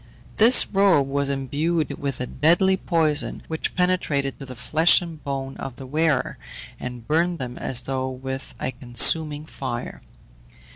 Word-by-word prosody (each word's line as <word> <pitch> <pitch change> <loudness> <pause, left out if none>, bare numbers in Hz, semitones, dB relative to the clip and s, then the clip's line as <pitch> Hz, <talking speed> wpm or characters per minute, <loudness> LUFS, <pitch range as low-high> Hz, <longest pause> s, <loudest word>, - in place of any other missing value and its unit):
This 230 +4 +8
robe 195 -8 +3
was 140 0 -1
imbued 145 +4 -1
with 140 -3 -3
a 125 - -2
deadly 170 +9 +2
poison 160 -5 -1
which 160 -1 -4
penetrated 165 -7 -1
to 135 - -9
the 130 - -9
flesh 160 +7 +4
and 165 -3 -9
bone 135 -1 -4
of 130 - -7
the 135 - -10
wearer, 150 0 0 0.4
and 125 -2 -7
burned 170 +3 +1
them 125 -3 -6
as 125 -2 0
though 130 0 -3
with 130 +1 -7
a 130 - -2
consuming 145 +5 +1
fire. 130 -5 -6
140 Hz, 150 wpm, -23 LUFS, 130-165 Hz, 0.4 s, This